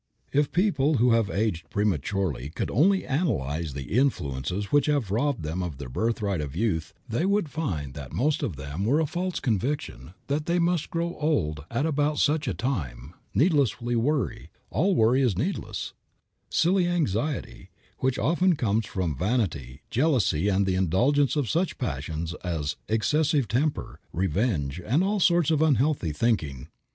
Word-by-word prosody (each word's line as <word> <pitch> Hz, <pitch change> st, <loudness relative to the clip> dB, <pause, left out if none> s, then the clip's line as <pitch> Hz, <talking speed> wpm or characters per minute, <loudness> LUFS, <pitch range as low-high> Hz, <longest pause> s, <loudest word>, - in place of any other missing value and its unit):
If 145 Hz, 0 st, +2 dB
people 165 Hz, -6 st, +2 dB
who 120 Hz, 0 st, +4 dB
have 115 Hz, -3 st, +3 dB
aged 85 Hz, -3 st, -1 dB
prematurely 95 Hz, -, -1 dB
could -, -, -3 dB
only 190 Hz, -, +3 dB
analyze 85 Hz, -, -1 dB
the 70 Hz, -, -4 dB
influences 90 Hz, -, -1 dB
which 145 Hz, -1 st, +4 dB
have 140 Hz, -10 st, 0 dB
robbed 125 Hz, -, 0 dB
them 80 Hz, +4 st, -3 dB
of 85 Hz, -6 st, -4 dB
their 70 Hz, -2 st, -7 dB
birthright 100 Hz, -, -1 dB
of 70 Hz, -1 st, -5 dB
youth 85 Hz, -6 st, -1 dB, 0.2 s
they 115 Hz, +8 st, -1 dB
would 200 Hz, -3 st, +1 dB
find 85 Hz, -, -3 dB
that 70 Hz, -3 st, -8 dB
most 140 Hz, -, +1 dB
of 95 Hz, -, -2 dB
them 70 Hz, +6 st, -5 dB
were 135 Hz, +9 st, +3 dB
a 160 Hz, -, +2 dB
false 180 Hz, +4 st, -2 dB
conviction 110 Hz, -, -2 dB
that 150 Hz, +2 st, -2 dB
they 170 Hz, +1 st, +2 dB
must 170 Hz, -2 st, +1 dB
grow 170 Hz, +1 st, -2 dB
old 75 Hz, -, 0 dB
at 120 Hz, +6 st, 0 dB
about 150 Hz, -1 st, +1 dB
such 155 Hz, +1 st, +2 dB
a -, -, 0 dB
time, 75 Hz, -, -3 dB, 0.2 s
needless 145 Hz, -, +3 dB
worry, 120 Hz, -, -1 dB, 0.2 s
all 175 Hz, -, +2 dB
worry 120 Hz, +3 st, +4 dB
is 120 Hz, -9 st, +1 dB
needless, 170 Hz, -, -3 dB, 0.6 s
silly 180 Hz, +1 st, +2 dB
anxiety, 150 Hz, -, -2 dB, 0.3 s
which 130 Hz, -1 st, 0 dB
often 170 Hz, -, +2 dB
comes 110 Hz, -4 st, 0 dB
from 90 Hz, -6 st, -2 dB
vanity, 85 Hz, -, -1 dB
jealousy 120 Hz, -, +2 dB
and 100 Hz, 0 st, +2 dB
the 95 Hz, -, +1 dB
indulgence 120 Hz, -, +2 dB
of 145 Hz, -5 st, 0 dB
such 170 Hz, +7 st, 0 dB
passions 80 Hz, -, -3 dB
as 80 Hz, -4 st, -2 dB
excessive 145 Hz, +4 st, +2 dB
temper, 135 Hz, +9 st, -1 dB
revenge, 90 Hz, -, -1 dB
and 140 Hz, -, +2 dB
all 205 Hz, +2 st, +1 dB
sorts 175 Hz, -4 st, +3 dB
of 155 Hz, -1 st, +2 dB
unhealthy 145 Hz, -, +2 dB
thinking. 75 Hz, -, -1 dB
115 Hz, 160 wpm, -26 LUFS, -, 0.6 s, who